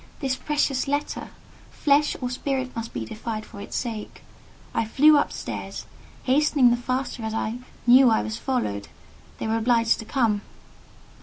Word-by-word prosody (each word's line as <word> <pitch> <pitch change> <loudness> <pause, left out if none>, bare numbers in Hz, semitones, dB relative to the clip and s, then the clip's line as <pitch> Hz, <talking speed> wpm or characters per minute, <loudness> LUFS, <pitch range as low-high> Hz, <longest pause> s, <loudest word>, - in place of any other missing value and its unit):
This 265 -3 0
precious 285 -2 0
letter! 290 +1 -2 0.4
Flesh 295 0 +2
or 250 -1 -2
spirit 260 0 -2
must 230 0 -4
be 115 -2 -4
defied 215 - -5
for 200 -3 -10
its 205 - -7
sake. 225 -4 -4 0.5
I - - +1
flew 295 +7 +5
up 290 - +2
stairs, - - -6 0.4
hastening 275 -2 +4
the - - +4
faster 255 +1 -3
as 220 0 -3
I 225 +2 -2 0.3
knew 250 +1 +7
I 220 - +2
was 220 - -4
followed: 105 - -2 0.5
they - - -4
were 220 +1 +1
obliged 230 0 +2
to 220 - -7
come. 220 -5 +1
245 Hz, 160 wpm, -25 LUFS, 220-270 Hz, 0.5 s, knew